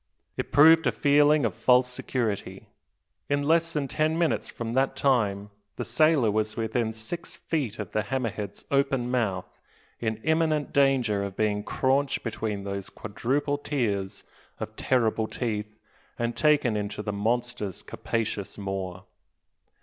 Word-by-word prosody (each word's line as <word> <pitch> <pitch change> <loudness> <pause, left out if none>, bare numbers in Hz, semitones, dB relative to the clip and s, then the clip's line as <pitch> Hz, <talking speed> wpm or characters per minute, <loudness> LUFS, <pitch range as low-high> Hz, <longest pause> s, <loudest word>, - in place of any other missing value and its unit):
It - - -4
proved 160 +2 +7
a - - +3
feeling 145 -1 +4
of 110 - 0
false 125 +5 +4
security. 120 -4 -3 0.6
In 145 0 +1
less 165 +2 +2
than 150 -4 -1
ten 155 +2 0
minutes 170 -2 0
from 115 -1 -5
that 135 +2 +1
time 105 -7 +1 0.2
the - - -4
sailor 155 -8 +3
was 110 +1 -1
within 110 0 0
six 110 +10 -7
feet 135 -10 -3
of 105 -4 -6
the 110 - +1
"hammer 120 +2 -2
head's" 100 -1 -7
open 135 -3 +1
mouth, 105 -8 -2 0.4
in 110 -2 -1
imminent 160 -2 +1
danger 130 -7 +3
of 100 -1 -5
being 105 -1 +1
craunched 135 +4 0
between 105 -3 -3
those 100 -1 -5
quadruple 140 +7 -2
tiers 105 -9 -2 0.4
of - - -6
terrible 115 -3 +1
teeth, 110 -3 -4 0.4
and 120 0 -1
taken 150 -7 +3
into 105 0 -3
the 105 - -3
monster's 115 -1 -2
capacious 105 -3 -3
maw. 95 -2 -4
120 Hz, 140 wpm, -27 LUFS, 105-140 Hz, 0.6 s, proved